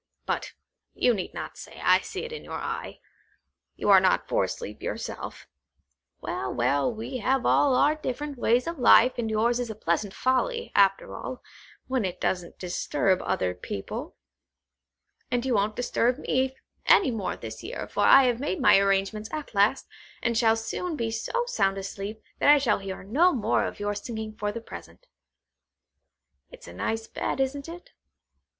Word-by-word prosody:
But - - -3 0.4
you 245 - +3
need 190 -4 -5
not - - -6
say; - - -11
I - - +5
see - - -6
it 475 - -6
in 460 - -7
your - - -6
eye. - - -5 0.8
You 205 - +1
are 195 - +9
not 185 0 +2
for - - +1
sleep - - -7
yourself. - - -5 0.8
Well, - - -3
well, 140 - +1
we 235 +3 -5
have 260 +2 0
all 275 -3 +4
our 295 +4 +4
different 295 -1 -4
ways 240 +2 +2
of 335 -3 -5
life, 245 0 +6
and 225 -2 -1
yours 230 +3 +1
is 245 -2 -3
a 220 - -5
pleasant 195 0 -1
folly, 470 - 0
after 195 -1 +3
all, 255 - -7 0.4
when 260 -3 -1
it 185 -2 -3
doesn't 180 -2 -2
disturb 185 +1 0
other 90 -1 -1
people. 105 - -6 1.1
And 245 0 -1
you 260 - +1
won't 210 0 +1
disturb 245 0 +1
me 265 -1 0 0.3
any 360 - +6
more 215 -5 -3
this - - -8
year, - - -6
for - - -7
I 270 - +8
have 245 -2 +1
made 295 +6 -2
my 260 -7 +6
arrangements 195 +2 0
at 305 -5 -6
last, 205 +6 +3 0.4
and 235 -1 +1
shall 225 -1 +4
soon 320 +9 -3
be 230 -5 -2
so 475 - -2
sound 195 - 0
asleep, 200 +2 -6 0.2
that - - +4
I 295 - +9
shall 245 -8 +1
hear 195 -1 -6
no 305 - +3
more 225 -3 +1
of - - -6
your 205 0 -1
singing 220 +1 -5
for 210 -1 -2
the 230 - -6
present. 365 - -11 1.4
It's - - -14
a - - -10
nice 225 0 -2
bed, 225 - -3
isn't 275 +3 -2
it? 350 +1 -10
230 Hz, 175 wpm, -26 LUFS, 205-265 Hz, 1.4 s, are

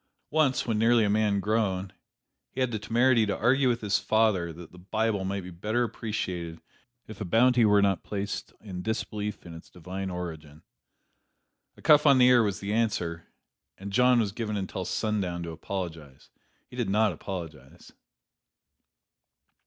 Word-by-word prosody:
Once, 150 -4 +2
when 110 -3 0
nearly 115 0 +4
a 105 - +1
man 105 -1 +2
grown, 100 -2 -1 0.6
he - - -8
had 130 -2 +1
the 110 - -3
temerity 120 +2 +3
to 105 - -1
argue 130 +3 +3
with 120 -1 -1
his 105 -2 +1
father 110 -6 +1
that 85 0 -11
the 90 - -14
Bible 100 +2 -1
might 100 0 -3
be 90 - -9
better 105 +8 -1
appreciated, 90 -7 -4 0.5
if 110 -1 -11
a - - 0
penalty 120 +5 +4
were 105 -1 +4
not 95 -3 +1
placed 100 0 -4
upon 95 -4 -8
disbelief 105 0 -4
in 85 - -9
its 80 - -12
divine 95 +3 -6
origin. 80 -4 -7 1.1
A - - -17
cuff 150 -1 +6
on 140 -2 +7
the 125 - +6
ear 125 -1 +6
was 100 -3 -1
the 100 +1 -3
answer, 90 -7 -1 0.5
and 100 +1 -8
John 125 +1 +4
was 105 -4 0
given 105 -1 -3
until 95 -1 -4
sundown 95 -6 -2
to 85 - -5
apologize. 80 -5 -7 0.3
He 125 - -14
did 120 -5 -2
not 105 +2 +2
apologize. 80 -8 -8
105 Hz, 165 wpm, -27 LUFS, 90-115 Hz, 1.1 s, on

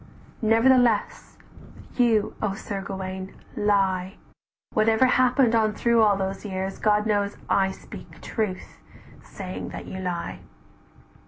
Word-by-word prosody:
"Nevertheless 230 0 +2 0.6
you, 230 -4 +2
O 200 -2 -1
Sir 195 -1 -5
Gauwaine, 190 0 -6 0.2
lie, 195 -2 +1 0.6
Whatever 220 +3 +4
happened 255 -1 +3
on 220 -2 +3
through 235 -1 +3
all 210 -2 +5
those 195 0 -3
years, 190 -1 -4
God 210 0 +2
knows 205 -1 0
I 190 -1 +2
speak 190 - -11
truth, 210 -5 -4 0.4
saying 185 -2 -7
that - - -8
you 190 - -7
lie. 180 -2 -4
205 Hz, 115 wpm, -25 LUFS, 190-225 Hz, 0.6 s, all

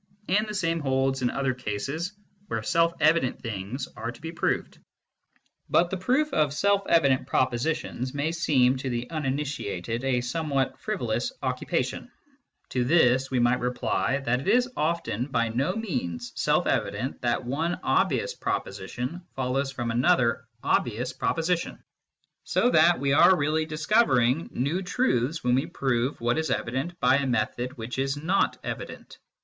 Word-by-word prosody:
And 210 +4 +2
the 210 - -5
same 165 -3 0
holds 135 -2 0
in 125 - +2
other 135 0 0
cases 140 - -4 0.3
where - - -3
self 170 -1 +3
evident 155 -4 +3
things 115 +4 -5
are 115 +2 -4
to - - -15
be 165 +1 -6
proved. 170 - -2 0.9
But 175 0 +3
the 190 - -1
proof 265 +10 +1
of 150 -2 +2
self 200 +3 +3
evident 140 -6 +3
propositions 130 0 -1
may 145 +3 -1
seem, 135 -6 +3
to 130 +1 -4
the 120 0 -3
uninitiated, 135 - -3
a 130 -2 +1
somewhat 135 +1 -1
frivolous - - -2
occupation, - - -2 0.6
To 125 - 0
this 130 -2 +3
we 130 - -1
might 120 +1 +3
reply 125 +2 0
that 125 -3 0
it 135 - -7
is 245 +1 +4
often 150 -7 -1
by 115 -4 0
no 135 - 0
means 125 - -3
self - - +2
evident 130 - -1
that 120 +1 0
one 155 +8 -1
obvious - - +1
proposition 125 - -4
follows 135 +1 -1
from 120 -3 -3
another 120 0 +2 0.2
obvious 120 +2 0
proposition; 170 +4 -1 0.7
so 245 - +2
that 175 -6 +5
we 140 0 +1
are 180 +5 +6
really 155 +2 0
discovering 155 - +2
new 145 +9 -1
truths 165 - 0
when 125 0 +2
we 130 +2 +1
prove 130 0 -1
what 120 +5 +1
is 160 - -2
evident 135 +9 -2
by 130 +1 +4
a 140 -1 -1
method 125 +2 -1
which 120 +3 -5
is 135 +1 0
not 175 +7 +1
evident. - - -7
135 Hz, 155 wpm, -26 LUFS, 125-165 Hz, 0.9 s, are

